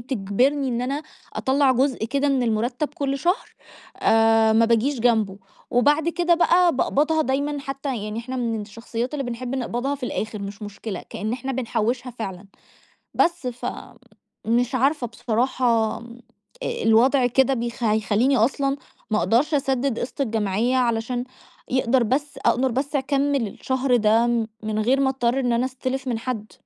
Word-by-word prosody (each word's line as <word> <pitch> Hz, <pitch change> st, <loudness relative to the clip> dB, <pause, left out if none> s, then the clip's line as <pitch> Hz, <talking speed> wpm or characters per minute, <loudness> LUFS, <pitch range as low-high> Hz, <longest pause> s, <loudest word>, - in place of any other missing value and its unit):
بتجبرني 255 Hz, +4 st, 0 dB
إن 240 Hz, -1 st, -1 dB
أنا 275 Hz, +4 st, -2 dB, 0.3 s
أطلّع 270 Hz, 0 st, +2 dB
جزء 260 Hz, -1 st, +1 dB
كده 280 Hz, +5 st, 0 dB
من 270 Hz, -2 st, +2 dB
المرتب 240 Hz, +5 st, 0 dB
كُلّ 275 Hz, -1 st, -2 dB
شهر، 355 Hz, +6 st, -1 dB, 0.5 s
آآ، 225 Hz, 0 st, +4 dB
ما 225 Hz, +1 st, +5 dB
باجيش 235 Hz, +4 st, +1 dB
جنبه، 220 Hz, -5 st, +2 dB, 0.3 s
وبعد 290 Hz, +6 st, +3 dB
كده 345 Hz, 0 st, +2 dB
بقى 350 Hz, -2 st, +4 dB
باقبضها 310 Hz, +4 st, +2 dB
دايمًا 285 Hz, +1 st, -1 dB
حتى 275 Hz, -4 st, -4 dB
يعني 215 Hz, +1 st, -4 dB
إحنا 255 Hz, +3 st, -5 dB
من 230 Hz, -3 st, -1 dB
الشخصيات 230 Hz, +5 st, -5 dB
اللي 280 Hz, -2 st, -2 dB
بنحب 245 Hz, +1 st, -4 dB
نقبضها 250 Hz, +2 st, -2 dB
في 285 Hz, -, -12 dB
الآخر، 215 Hz, -3 st, -4 dB
مش 200 Hz, +2 st, -7 dB
مشكلة، 205 Hz, -1 st, -6 dB
كأن 215 Hz, +2 st, -3 dB
إحنا 260 Hz, +2 st, -3 dB
بنحوّشها 245 Hz, 0 st, -1 dB
فعلًا. 200 Hz, -5 st, -7 dB, 0.7 s
بس، 335 Hz, -6 st, +1 dB
فمش 245 Hz, 0 st, -4 dB
عارفة 270 Hz, 0 st, +1 dB
بصراحة 230 Hz, 0 st, 0 dB
آمم، 235 Hz, +1 st, -11 dB, 0.5 s
أ 480 Hz, -1 st, -3 dB
الوضع 250 Hz, +4 st, +4 dB
كده 265 Hz, +2 st, +3 dB
بيخ 235 Hz, -1 st, -4 dB
هيخلّيني 220 Hz, +4 st, +2 dB
أصلًا 275 Hz, +4 st, +1 dB, 0.3 s
ما 215 Hz, -, +3 dB
أقدرش 255 Hz, +10 st, +2 dB
أسدد 270 Hz, -3 st, 0 dB
قسط 260 Hz, -, -4 dB
الجمعية 225 Hz, +1 st, 0 dB
علشان 240 Hz, 0 st, 0 dB, 0.5 s
يقدر 255 Hz, -1 st, +2 dB
بس 280 Hz, +5 st, -1 dB
أقدر 255 Hz, 0 st, +3 dB
بس 280 Hz, +4 st, -2 dB
أكمّل 275 Hz, -2 st, +1 dB
الشهر 260 Hz, +4 st, 0 dB
ده، 225 Hz, +1 st, +3 dB, 0.4 s
من 215 Hz, 0 st, -2 dB
غير 250 Hz, +5 st, +2 dB
ما 265 Hz, -, +3 dB
أضطر 255 Hz, 0 st, 0 dB
إن 245 Hz, -2 st, +1 dB
أنا 235 Hz, +2 st, +1 dB
أستلف 260 Hz, +1 st, -4 dB
من 235 Hz, -3 st, -1 dB
حد. 225 Hz, -3 st, -4 dB
250 Hz, 155 wpm, -23 LUFS, 225-275 Hz, 0.7 s, ما